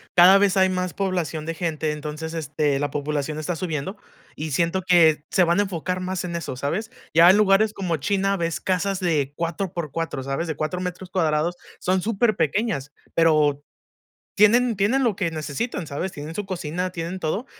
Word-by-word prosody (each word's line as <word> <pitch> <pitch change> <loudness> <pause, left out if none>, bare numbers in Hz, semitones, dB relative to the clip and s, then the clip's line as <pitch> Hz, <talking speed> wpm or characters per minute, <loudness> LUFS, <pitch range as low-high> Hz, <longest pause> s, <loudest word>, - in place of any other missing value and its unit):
cada 180 +2 +8
vez 200 -1 +3
hay 190 -1 +4
más 185 -1 -2
población 175 -6 -2
de 165 +1 -4
gente, 155 -2 -2
entonces, 150 +2 -5
este, 150 -3 -1
la 145 0 -1
población 150 +1 -2
está 160 +3 -2
subiendo 165 +2 -4 0.4
y 155 0 -5
siento 170 +6 0
que 160 -5 +5
se 185 - +4
van 170 +2 +2
a - - +4
enfocar 180 -1 -3
más 185 0 -3
en 175 -1 -4
eso, 165 -6 -4
¿sabes? 175 - -3 0.2
Ya 170 +2 +8
en 190 - +6
lugares 210 +1 +4
como 180 -5 -2
China 195 +5 0
ves 165 -2 -2
casas 190 +1 0
de 150 -6 0
4 170 +3 -3
por 170 -5 -4
4, 165 -4 -3
¿sabes? 135 +6 -3
De 160 - -3
4 155 +4 -2
metros 180 0 -5
cuadrados, 165 -2 0 0.2
son 185 +1 +1
superpequeñas, 210 - 0 0.2
pero 150 -3 +3 0.7
tienen 230 +3 +5
tienen 225 +8 +2
lo 230 -5 +1
que 185 -3 -1
necesitan, 160 - -4
¿sabes? 160 +7 -3
Tienen 150 +2 -7
su 210 - -3
cocina, 180 -1 -3
tienen 170 +1 -5
todo. 185 +9 -2
170 Hz, 185 wpm, -23 LUFS, 155-190 Hz, 0.7 s, cada